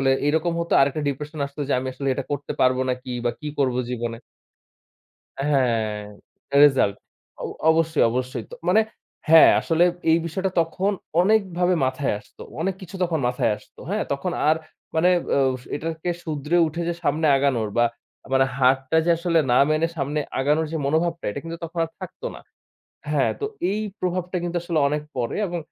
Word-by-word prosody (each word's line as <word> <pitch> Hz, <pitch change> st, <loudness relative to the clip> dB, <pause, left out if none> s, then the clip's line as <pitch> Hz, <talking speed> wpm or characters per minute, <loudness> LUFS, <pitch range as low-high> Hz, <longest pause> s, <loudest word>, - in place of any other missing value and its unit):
আসলে 135 Hz, 0 st, +3 dB, 0.2 s
এরকম 160 Hz, +3 st, +1 dB
হত। 170 Hz, -, -4 dB
আরেকটা 140 Hz, +2 st, +2 dB
ডিপ্রেশন 150 Hz, +3 st, -5 dB
আসত 140 Hz, +1 st, -17 dB
যে -, -, +1 dB
আমি 130 Hz, +1 st, -3 dB
আসলে 135 Hz, +1 st, -3 dB
এটা 135 Hz, -, -3 dB
করতে 145 Hz, 0 st, -3 dB
পারব 130 Hz, 0 st, +4 dB
নাকি 125 Hz, 0 st, -4 dB
বা 120 Hz, -, +2 dB
কি 150 Hz, -, -4 dB
করব 130 Hz, -3 st, +2 dB, 0.2 s
জীবনে। 120 Hz, -2 st, -3 dB, 1.3 s
হ্যাঁ 120 Hz, -7 st, +1 dB, 0.7 s
রেসাল্ট। 135 Hz, -8 st, +4 dB, 0.5 s
অ -, -, -2 dB, 0.3 s
অবশ্যই, 160 Hz, -1 st, +2 dB
অবশ্যই। 125 Hz, -1 st, -3 dB
তো -, -, -7 dB
মানে 215 Hz, +5 st, +5 dB, 0.5 s
হ্যাঁ 160 Hz, 0 st, +9 dB
আসলে 165 Hz, +1 st, +2 dB, 0.3 s
এই 165 Hz, -, +5 dB
বিষয়টা 190 Hz, +3 st, -2 dB
তখন 185 Hz, +5 st, -1 dB, 0.3 s
অনেকভাবে 185 Hz, -3 st, +2 dB
মাথায় 130 Hz, 0 st, -1 dB
আসত। 105 Hz, -, -24 dB, 0.2 s
অনেক 190 Hz, +2 st, -1 dB
কিছু 190 Hz, +1 st, -9 dB
তখন 170 Hz, -3 st, 0 dB
মাথায় 125 Hz, -2 st, +1 dB
আসত। 105 Hz, -, -22 dB
হ্যাঁ 210 Hz, +2 st, 0 dB
তখন 175 Hz, +6 st, -3 dB, 0.2 s
আর 155 Hz, -, +5 dB
আ -, -, -21 dB, 0.3 s
মানে 165 Hz, +3 st, +4 dB, 0.7 s
এটাকে 160 Hz, +3 st, -4 dB
শুদরে 155 Hz, 0 st, -1 dB
উঠে 165 Hz, +2 st, -4 dB
যে -, -, 0 dB
সামনে 155 Hz, +1 st, +1 dB
আগানোর 130 Hz, -6 st, +1 dB
বা 120 Hz, -, +5 dB, 0.5 s
মানে 135 Hz, 0 st, +5 dB
হারটা 135 Hz, +3 st, +3 dB
যে -, -, +1 dB
আসলে 170 Hz, -1 st, +2 dB
না 125 Hz, -, +5 dB
মেনে 155 Hz, +2 st, +2 dB
সামনে 145 Hz, +1 st, -1 dB, 0.2 s
আগানোর 150 Hz, +4 st, +2 dB
যে -, -, 0 dB
মনোভাবটা, 165 Hz, +4 st, 0 dB
এটা -, -, -5 dB
কিন্তু 165 Hz, 0 st, -6 dB
তখন 165 Hz, +1 st, -6 dB
আর -, -, -12 dB
থাকত 185 Hz, -1 st, -9 dB
না। -, -, -10 dB, 0.7 s
হ্যাঁ -, -, +2 dB
তো -, -, -2 dB, 0.3 s
এই 210 Hz, +2 st, -1 dB, 0.2 s
প্রভাবটা 180 Hz, 0 st, -2 dB
কিন্তু 175 Hz, 0 st, -3 dB
আসলে 170 Hz, -2 st, -1 dB
অনেক 150 Hz, +1 st, -1 dB
পড়ে 120 Hz, -2 st, -2 dB
এবং 175 Hz, -1 st, -3 dB
155 Hz, 175 wpm, -23 LUFS, 135-170 Hz, 1.3 s, হ্যাঁ